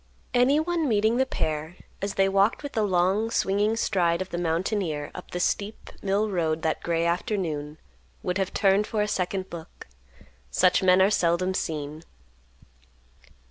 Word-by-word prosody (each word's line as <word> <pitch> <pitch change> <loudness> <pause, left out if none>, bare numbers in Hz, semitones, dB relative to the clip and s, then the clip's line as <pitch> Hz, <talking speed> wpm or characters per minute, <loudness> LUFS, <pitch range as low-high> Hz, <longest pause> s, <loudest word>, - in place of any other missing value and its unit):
Anyone 305 +6 +2
meeting 220 +2 +2
the 265 +1 +2
pair, 155 -6 -3 0.3
as 200 0 -3
they 195 0 +3
walked 195 +7 +2
with 285 - -5
the 220 - 0
long 195 +2 +2
swinging 205 +1 +1
stride 175 -6 +1
of 185 0 -4
the 175 - -2
mountaineer 165 -2 -1
up 180 - -9
the 180 - -4
steep 200 +4 -2
mill 200 +2 +1
road 160 -3 -1
that 160 - 0
gray 170 -1 0
afternoon, 170 -4 -2 0.5
would 180 +2 -1
have 190 -1 -1
turned 200 +1 +2
for 215 -2 0
a - - -1
second 190 -1 -1
look; 165 -1 -10 0.6
such 180 - +3
men 185 0 +5
are 195 - +3
seldom 180 0 +1
seen. 155 -3 -3
190 Hz, 155 wpm, -26 LUFS, 170-210 Hz, 0.6 s, men